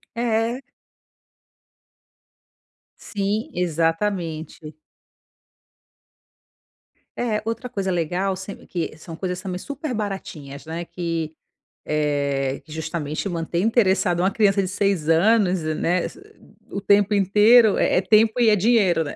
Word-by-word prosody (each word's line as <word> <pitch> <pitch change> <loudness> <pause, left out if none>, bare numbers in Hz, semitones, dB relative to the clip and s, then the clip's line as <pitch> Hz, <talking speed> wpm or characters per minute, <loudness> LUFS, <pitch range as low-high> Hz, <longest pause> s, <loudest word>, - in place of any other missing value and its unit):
É. 235 +1 0 2.5
Sim, 205 +3 -1
exatamente. 165 -2 -2 2.4
É. 220 -3 -1
Outra 230 +2 -4
coisa 195 -5 -2
legal 180 +3 -1
se 190 +1 -7
que 170 -3 -4
são 160 +1 -9
coisas 180 0 -4
também 185 -2 -5
super 285 - -5
baratinhas, 165 -9 -6
né, 165 +2 -5
que, 165 -2 -4 0.6
eh, 140 -3 -1
justamente 155 +1 -4
mantém 170 +1 -2
interessado 195 -5 +2
uma 190 +2 +3
criança 200 -2 +2
de 185 - -2
6 195 -5 0
anos, 185 +1 +3
né, 165 +3 0 0.7
o 200 - -4
tempo 205 +1 +3
inteiro, 210 +3 +5
é - - +2
é - - +4
tempo 220 +4 +3
e, 230 - +5
é 210 - +4
dinheiro, 195 -6 +3
né. 145 - -6
185 Hz, 115 wpm, -23 LUFS, 165-210 Hz, 2.5 s, inteiro